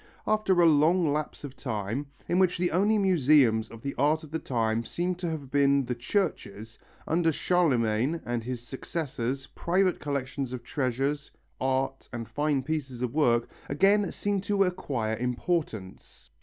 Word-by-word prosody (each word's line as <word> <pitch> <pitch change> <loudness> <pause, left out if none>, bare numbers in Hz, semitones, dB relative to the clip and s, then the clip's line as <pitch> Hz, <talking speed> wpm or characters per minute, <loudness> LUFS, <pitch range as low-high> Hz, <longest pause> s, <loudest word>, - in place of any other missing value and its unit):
After 215 -4 +2
a 170 - +6
long 160 +1 +4
lapse 150 0 -3
of 140 -2 -7
time, 115 +2 -3 0.2
in 175 - +2
which 185 -2 +3
the 175 0 0
only 205 +6 +3
museums 145 - +4
of 115 -1 -12
the 140 - -3
art 150 +3 +2
of 155 - -12
the 160 - -2
time 115 -4 0
seem 175 +8 -2
to 175 -1 -4
have 145 -5 -5
been 140 -1 +3
the 125 - -2
churches, 115 - -3 0.3
under 165 0 +2
Charlemagne 135 -5 +1
and 120 -1 -2
his 125 0 -5
successors 135 -2 -3
private 185 +1 +1
collections 140 -2 -3
of 125 -2 -6
treasures, 135 +2 -1 0.3
art 135 +1 -1
and 115 -2 -5
fine 145 -2 0
pieces 135 -4 -3
of 125 -1 -2
work 120 -6 +3 0.2
again 195 +7 +3
seem 205 -1 -1
to 200 0 +2
acquire 140 - -2
importance. 125 - -3
140 Hz, 155 wpm, -28 LUFS, 120-170 Hz, 0.3 s, a